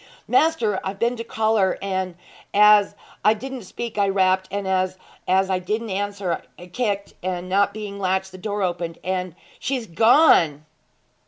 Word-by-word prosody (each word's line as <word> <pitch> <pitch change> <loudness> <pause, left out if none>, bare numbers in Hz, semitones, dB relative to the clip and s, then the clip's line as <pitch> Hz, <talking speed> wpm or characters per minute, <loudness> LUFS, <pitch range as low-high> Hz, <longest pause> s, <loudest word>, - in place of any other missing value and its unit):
'Maister, 235 -12 +2
I've 190 +1 -4
been 235 +4 +1
to 230 - -4
call 220 -1 0
her; 190 -2 +2
and 190 -2 -3 0.4
as 210 0 +6 0.3
'a 215 - +5
didn't 260 0 -7
speak 225 +2 -6
I 200 -1 +3
rapped, 190 -1 +2
and 200 0 -3
as 185 0 0 0.3
'a 190 0 +2
didn't 215 +4 -3
answer 200 -3 -2 0.2
I 175 - -11
kicked, 200 +1 -3
and 180 0 -3
not 200 +2 +2
being 205 -1 -7
latched 190 0 -1
the 185 - -11
door 205 +1 -2
opened, 175 -2 -3
and 185 -2 -3 0.2
she's 255 -3 -2
gone!' 170 - +4
195 Hz, 160 wpm, -22 LUFS, 185-215 Hz, 0.4 s, as